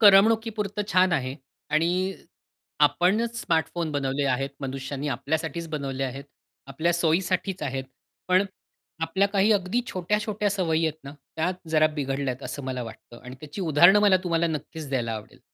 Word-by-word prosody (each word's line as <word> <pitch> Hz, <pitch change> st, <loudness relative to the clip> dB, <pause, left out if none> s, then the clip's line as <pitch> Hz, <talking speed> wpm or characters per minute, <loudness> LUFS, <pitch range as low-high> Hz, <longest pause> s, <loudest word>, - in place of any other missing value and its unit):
करमणुकीपुरतं 210 Hz, 0 st, +4 dB
छान 185 Hz, -1 st, +4 dB
आहे. 130 Hz, -4 st, 0 dB, 0.4 s
आणि 180 Hz, +5 st, +1 dB, 0.7 s
आपणच 225 Hz, +6 st, +3 dB
स्मार्टफोन 165 Hz, -1 st, 0 dB
बनवले 140 Hz, 0 st, 0 dB
आहेत 135 Hz, +1 st, 0 dB
मनुष्यांनी, 135 Hz, +1 st, -4 dB
आपल्यासाठीच 160 Hz, +5 st, -2 dB
बनवले 135 Hz, -3 st, -2 dB
आहेत. 135 Hz, +2 st, -5 dB, 0.4 s
आपल्या 155 Hz, +6 st, 0 dB
सोयीसाठीच 180 Hz, +3 st, 0 dB
आहेत. 135 Hz, -1 st, -2 dB, 0.4 s
पण 185 Hz, +2 st, +4 dB, 0.6 s
आपल्या 190 Hz, +5 st, +2 dB
काही 200 Hz, +2 st, +3 dB
अगदी 200 Hz, +3 st, +1 dB
छोट्या-छोट्या 210 Hz, +1 st, -1 dB
सवयी 165 Hz, -5 st, +1 dB
आहेत 155 Hz, 0 st, -3 dB
ना, 140 Hz, -, -8 dB, 0.2 s
त्या 160 Hz, +3 st, +1 dB, 0.2 s
जरा 155 Hz, -1 st, +5 dB
बिघडल्यात 135 Hz, -2 st, -2 dB
असं 145 Hz, -, -5 dB
मला 130 Hz, -1 st, -3 dB
वाटतं 115 Hz, +1 st, -11 dB
आणि 125 Hz, +1 st, -8 dB
त्याची 155 Hz, +5 st, -7 dB
उदाहरण 175 Hz, +3 st, +6 dB
मला 205 Hz, -2 st, +6 dB
तुम्हाला 170 Hz, -1 st, +2 dB
नक्कीच 155 Hz, 0 st, -5 dB
द्यायला 120 Hz, -4 st, -1 dB
आवडेल. 110 Hz, -1 st, -8 dB
160 Hz, 145 wpm, -26 LUFS, 140-190 Hz, 0.7 s, उदाहरण